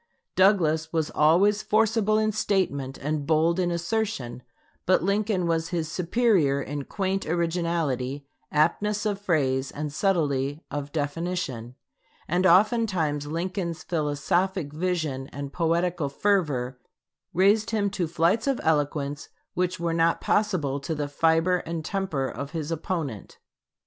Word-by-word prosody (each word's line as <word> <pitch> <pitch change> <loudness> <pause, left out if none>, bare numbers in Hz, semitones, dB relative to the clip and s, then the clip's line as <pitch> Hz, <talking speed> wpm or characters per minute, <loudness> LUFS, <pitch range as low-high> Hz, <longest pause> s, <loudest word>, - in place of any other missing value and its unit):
Douglas 160 -5 +3
was 160 -2 -1
always 190 +7 +4
forcible 215 0 +2
in 215 0 +2
statement 175 -11 -1
and 145 0 -3
bold 165 +2 +3
in 180 -1 +1
assertion; 170 - -2 0.5
but 185 -3 +4
Lincoln 200 -1 +1
was 165 -1 0
his 165 -3 -2
superior 180 - +2
in 140 0 -4
quaint 195 -1 -2
originality, 165 -6 -1 0.3
aptness 205 +8 +1
of 205 -2 -1
phrase, 135 -8 +1
and 150 -1 -5
subtlety 145 -5 0
of 145 -1 -4
definition; 145 -5 -3 0.5
and 180 +3 +2
oftentimes 185 -7 +3
Lincoln's 170 +1 -3
philosophic 160 +1 -1
vision 155 -6 -2
and 140 0 -7
poetical 170 -2 0
fervor 140 -8 0 0.5
raised 205 +5 +3
him 205 -3 0
to 185 -4 -1
flights 170 - +1
of 270 -2 +1
eloquence 145 -2 0 0.2
which 180 -1 -1
were 170 -1 -1
not 165 0 +2
possible 175 -10 0
to 160 +3 -3
the 145 -1 -2
fiber 165 +4 +2
and 165 -2 -5
temper 185 -10 -1
of 140 +4 -6
his 160 -1 -3
opponent. 160 - -4
165 Hz, 130 wpm, -26 LUFS, 145-190 Hz, 0.5 s, always